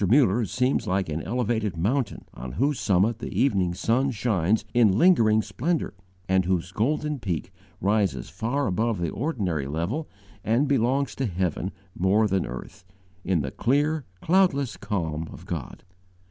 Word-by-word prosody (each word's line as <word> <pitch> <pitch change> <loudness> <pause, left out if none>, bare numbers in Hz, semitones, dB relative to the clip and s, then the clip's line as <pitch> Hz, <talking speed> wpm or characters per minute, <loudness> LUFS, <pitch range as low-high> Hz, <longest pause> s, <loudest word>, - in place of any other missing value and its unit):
Muller 120 -3 +4
seems 125 +6 0
like 95 -2 0
an 80 +1 -2
elevated 110 -5 -1
mountain, 115 +7 -1
on 60 +1 -7
whose 140 - +1
summit 105 +4 +2
the - - -5
evening 95 -9 +2
sun 125 +8 +1
shines 110 -4 +1
in 110 -5 +4
lingering 110 -10 +5
splendour, 135 - -2 0.3
and 95 0 +3
whose 90 -1 0
golden 150 +7 0
peak 90 -6 -3 0.3
rises 100 - +1
far 115 - -2
above 110 +3 0
the 85 -2 -1
ordinary 95 - -2
level 85 - -2 0.3
and 120 +6 +2
belongs 135 0 +1
to 135 - -2
heaven 90 0 -2 0.2
more 100 +4 +3
than 95 -2 0
earth, 65 +8 -8 0.4
in 90 -4 +1
the 65 -2 -4
clear, 145 +5 +1 0.2
cloudless 160 - +2
calm 80 -6 -3
of - - -11
God. - - -6
110 Hz, 145 wpm, -25 LUFS, 90-130 Hz, 0.4 s, lingering